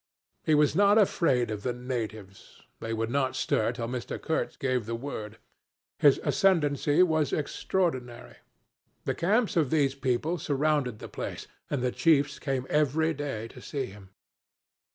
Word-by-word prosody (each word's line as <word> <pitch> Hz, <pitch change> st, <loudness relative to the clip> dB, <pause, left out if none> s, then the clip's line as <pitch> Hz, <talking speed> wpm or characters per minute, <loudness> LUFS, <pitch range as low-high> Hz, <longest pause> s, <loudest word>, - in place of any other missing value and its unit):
He 155 Hz, -, +2 dB
was 150 Hz, 0 st, +3 dB
not 205 Hz, +2 st, +5 dB
afraid 135 Hz, -, +2 dB
of 105 Hz, -1 st, -4 dB
the 125 Hz, +3 st, -1 dB
natives; 110 Hz, -6 st, -6 dB, 0.2 s
they 115 Hz, -, -5 dB
would 115 Hz, 0 st, -2 dB
not 135 Hz, -1 st, 0 dB
stir 110 Hz, +1 st, +1 dB
till 120 Hz, -1 st, -4 dB
Mr. 125 Hz, 0 st, -4 dB
Kurtz 160 Hz, -, -2 dB
gave 130 Hz, -5 st, -1 dB
the 115 Hz, -, -2 dB
word. 110 Hz, -4 st, -6 dB, 0.6 s
His 145 Hz, -2 st, +5 dB
ascendency 155 Hz, -4 st, +3 dB
was 155 Hz, -4 st, +1 dB
extraordinary. 140 Hz, -6 st, -2 dB, 0.7 s
The -, -, 0 dB
camps 210 Hz, +6 st, +1 dB
of 155 Hz, -6 st, +2 dB
these 140 Hz, -3 st, +2 dB
people 140 Hz, +5 st, -1 dB
surrounded 145 Hz, -4 st, 0 dB
the -, -, -8 dB
place, -, -, -6 dB, 0.2 s
and 140 Hz, -4 st, -1 dB
the 125 Hz, -, +1 dB
chiefs 145 Hz, -2 st, +2 dB
came 135 Hz, -3 st, -2 dB
every 155 Hz, +2 st, +2 dB
day 135 Hz, -7 st, -4 dB
to -, -, -13 dB
see 140 Hz, -3 st, -3 dB
him. 95 Hz, -3 st, -13 dB
140 Hz, 155 wpm, -28 LUFS, 120-155 Hz, 0.7 s, not